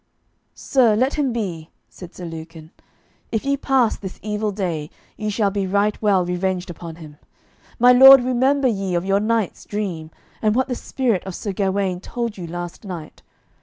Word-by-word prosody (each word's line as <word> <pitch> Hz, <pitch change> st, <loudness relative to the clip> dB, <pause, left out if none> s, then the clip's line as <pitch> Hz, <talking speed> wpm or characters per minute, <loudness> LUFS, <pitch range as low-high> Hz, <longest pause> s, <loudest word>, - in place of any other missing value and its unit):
"Sir, 240 Hz, -6 st, +3 dB
let 255 Hz, +6 st, +1 dB
him 285 Hz, -4 st, 0 dB
be," 180 Hz, -9 st, -4 dB, 0.2 s
said 180 Hz, -2 st, -12 dB
Sir 180 Hz, -, -8 dB
Lucan. 165 Hz, -1 st, -9 dB, 0.6 s
"If 220 Hz, +1 st, -2 dB
ye 280 Hz, 0 st, +2 dB
pass 265 Hz, -4 st, +1 dB
this 190 Hz, -2 st, -8 dB
evil 210 Hz, 0 st, -2 dB
day, 170 Hz, -7 st, -3 dB, 0.3 s
ye 215 Hz, -1 st, -3 dB
shall 205 Hz, -1 st, +1 dB
be 195 Hz, -1 st, -2 dB
right 205 Hz, +2 st, 0 dB
well 195 Hz, -4 st, +3 dB
revenged 180 Hz, +1 st, -2 dB
upon 165 Hz, -1 st, -9 dB
him. 155 Hz, -3 st, -12 dB, 0.6 s
My 245 Hz, +1 st, +6 dB
lord 265 Hz, +1 st, +9 dB
remember 260 Hz, +2 st, +2 dB
ye 195 Hz, -6 st, -1 dB
of 175 Hz, +1 st, -1 dB
your 195 Hz, +1 st, +2 dB
night's 220 Hz, -1 st, -1 dB
dream, 185 Hz, -7 st, -4 dB, 0.3 s
and 215 Hz, -1 st, +2 dB
what 260 Hz, +1 st, +1 dB
the 255 Hz, -, -2 dB
spirit 240 Hz, -5 st, -1 dB
of 190 Hz, -, -5 dB
Sir 205 Hz, -, -4 dB
Gawaine 190 Hz, -1 st, -1 dB
told 235 Hz, +2 st, -4 dB
you 175 Hz, -3 st, -7 dB
last 175 Hz, +3 st, -7 dB
night. 175 Hz, -6 st, -8 dB
200 Hz, 175 wpm, -21 LUFS, 175-235 Hz, 0.6 s, lord